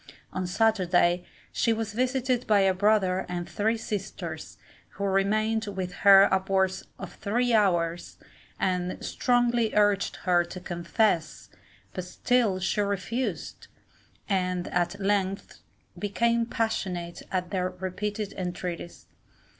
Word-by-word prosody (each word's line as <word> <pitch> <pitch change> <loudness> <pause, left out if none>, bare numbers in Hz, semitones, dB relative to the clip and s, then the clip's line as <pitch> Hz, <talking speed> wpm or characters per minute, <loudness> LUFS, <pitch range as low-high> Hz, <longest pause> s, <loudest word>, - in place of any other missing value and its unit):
On 185 -1 -2
Saturday, 180 -3 +2 0.3
she 230 - +1
was 225 -1 -2
visited 255 +1 0
by 210 -2 +5
a 190 -1 +4
brother 190 -1 +2
and 175 -1 -3
three 220 +2 0
sisters, 205 -3 -5 0.4
who 200 - -6
remained 215 +3 +1
with 190 -2 -4
her 195 0 +8
upwards 190 0 +1
of - - -8
three 240 +4 0
hours, 175 -5 +1 0.4
and 180 -1 -1
strongly 240 -2 +1
urged 205 -1 +2
her 175 -1 +4
to 175 +2 -8
confess, 175 -1 -1 0.4
but 185 - -4
still 215 +1 +1
she 190 +3 0
refused, 200 +5 -3 0.6
and 185 -3 -1
at 175 +3 -1
length 195 -1 -1 0.4
became 230 +3 +1
passionate 185 -7 -2
at 180 -2 -2
their 185 -1 0
repeated 190 +3 -4
entreaties. 180 -1 -5
195 Hz, 115 wpm, -27 LUFS, 180-220 Hz, 0.6 s, her